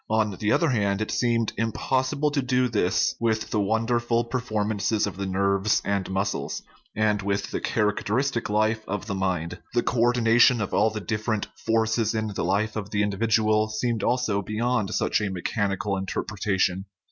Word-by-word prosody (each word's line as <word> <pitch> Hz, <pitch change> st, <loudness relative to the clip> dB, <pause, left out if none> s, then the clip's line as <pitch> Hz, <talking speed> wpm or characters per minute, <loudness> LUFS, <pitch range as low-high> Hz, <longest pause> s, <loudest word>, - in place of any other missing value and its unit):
On 110 Hz, -2 st, +1 dB
the 105 Hz, +1 st, +1 dB
other 165 Hz, -, +3 dB
hand, 100 Hz, -4 st, +1 dB
it 110 Hz, -, -2 dB
seemed 115 Hz, -2 st, +1 dB
im 115 Hz, 0 st, 0 dB
possible 135 Hz, +5 st, 0 dB
to 145 Hz, -1 st, 0 dB
do 125 Hz, 0 st, +1 dB
this 95 Hz, -5 st, +1 dB
with 110 Hz, -1 st, 0 dB
the 105 Hz, -, +1 dB
wonderful 115 Hz, +3 st, +1 dB
performances 110 Hz, -3 st, -1 dB
of 100 Hz, -, -5 dB
the 100 Hz, 0 st, -4 dB
nerves 100 Hz, +2 st, +1 dB
and 100 Hz, -2 st, -1 dB
muscles, 95 Hz, +1 st, -2 dB, 0.3 s
and 105 Hz, -1 st, +1 dB
with 100 Hz, +1 st, -2 dB
the -, -, -3 dB
characteristic 115 Hz, +4 st, 0 dB
life 110 Hz, +1 st, +1 dB
of 105 Hz, 0 st, -3 dB
the 100 Hz, -, -3 dB
mind; 90 Hz, -3 st, -2 dB
the 120 Hz, -, +3 dB
co 125 Hz, -, -1 dB
ordination 120 Hz, 0 st, +4 dB
of 105 Hz, -, -3 dB
all 110 Hz, -, +4 dB
the 110 Hz, 0 st, -5 dB
different 110 Hz, 0 st, -2 dB, 0.2 s
forces 110 Hz, 0 st, +1 dB
in 110 Hz, -1 st, -1 dB
the 100 Hz, -, -3 dB
life 100 Hz, +5 st, 0 dB
of 105 Hz, -2 st, -4 dB
the 105 Hz, -1 st, +1 dB
individual 110 Hz, +1 st, +2 dB
seemed 115 Hz, +1 st, -1 dB
also 120 Hz, -5 st, +1 dB
beyond 110 Hz, +1 st, -1 dB
such -, -, +1 dB
a 105 Hz, -, -1 dB
mechanical 100 Hz, +2 st, -1 dB
interpretation. 95 Hz, -1 st, -1 dB
110 Hz, 170 wpm, -25 LUFS, 100-115 Hz, 0.3 s, ordination